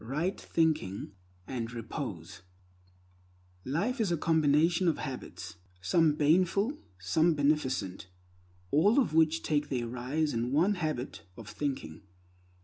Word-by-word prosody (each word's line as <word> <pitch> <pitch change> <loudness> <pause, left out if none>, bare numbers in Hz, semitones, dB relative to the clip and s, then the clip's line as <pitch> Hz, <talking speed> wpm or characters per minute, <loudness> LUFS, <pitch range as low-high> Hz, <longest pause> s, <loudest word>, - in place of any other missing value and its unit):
Right 155 - -2
Thinking 155 - 0 0.3
and 120 -3 -4
Repose 105 - -6 1.2
LIFE 205 - -1
IS 200 -5 +1
A 170 - +1
COMBINATION 160 +3 +3
OF 165 - +2
HABITS, 95 - -7 0.2
some 155 - +3
baneful, 185 - +2 0.2
some 155 - +2
beneficent, 135 -11 0 0.6
all 200 - +4
of 240 - +1
which 160 0 +3
take 145 -1 0
their 125 -3 -1
rise 130 +6 -2
in 115 - 0
the 120 - -1
one 160 +10 +3
habit 155 -8 -3 0.2
of 115 - -10
thinking. 130 - -4
150 Hz, 125 wpm, -30 LUFS, 120-165 Hz, 1.2 s, all